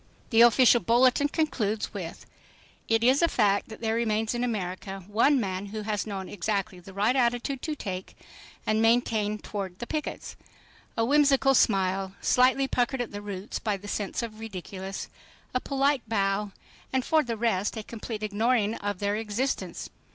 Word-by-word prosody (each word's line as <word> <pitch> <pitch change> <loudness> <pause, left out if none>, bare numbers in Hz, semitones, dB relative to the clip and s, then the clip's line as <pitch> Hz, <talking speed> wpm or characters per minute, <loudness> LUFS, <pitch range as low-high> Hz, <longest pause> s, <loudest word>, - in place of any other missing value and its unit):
The 225 0 +6
official 240 +1 +7
bulletin 255 +4 +4
concludes 225 -10 -1
with: - - -7 0.6
"It 225 0 +3
is 260 +5 +4
a 335 - +5
fact 205 -8 +1
that 220 - -10
there 220 -1 0
remains 225 -1 0
in 240 0 -1
America 195 -4 -3
one 230 +8 +3
man 195 -2 -3
who 215 +1 -5
has 210 0 -2
known 195 -3 -4
exactly 200 0 -2
the 180 +2 -12
right 205 +6 +1
attitude 245 +1 0
to 310 -2 -3
take 190 -8 -6 0.5
and 215 0 +2
maintain 225 -2 +2
toward 195 -4 -6
the 240 - -5
pickets. 305 +4 -4 0.6
A 225 - +2
whimsical 275 0 +4
smile, 195 -4 +2
slightly 260 +2 +3
puckered 250 +1 0
at 245 - -3
the 205 - -6
roots 200 -1 -5
by 210 -2 -1
a 200 +1 -10
sense 205 +3 -2
of 230 -2 -5
the 215 - -15
ridiculous, 195 -2 -6 0.5
a 255 - +2
polite 275 0 +1
bow—and 205 +5 -2
for 315 -1 +4
the 235 -5 -4
rest 215 -2 0
a 220 - -4
complete 220 -1 -6
ignoring 215 +1 +1
of 205 -1 -3
their 205 +1 0
existence. 225 +5 -3
220 Hz, 165 wpm, -27 LUFS, 200-245 Hz, 0.6 s, official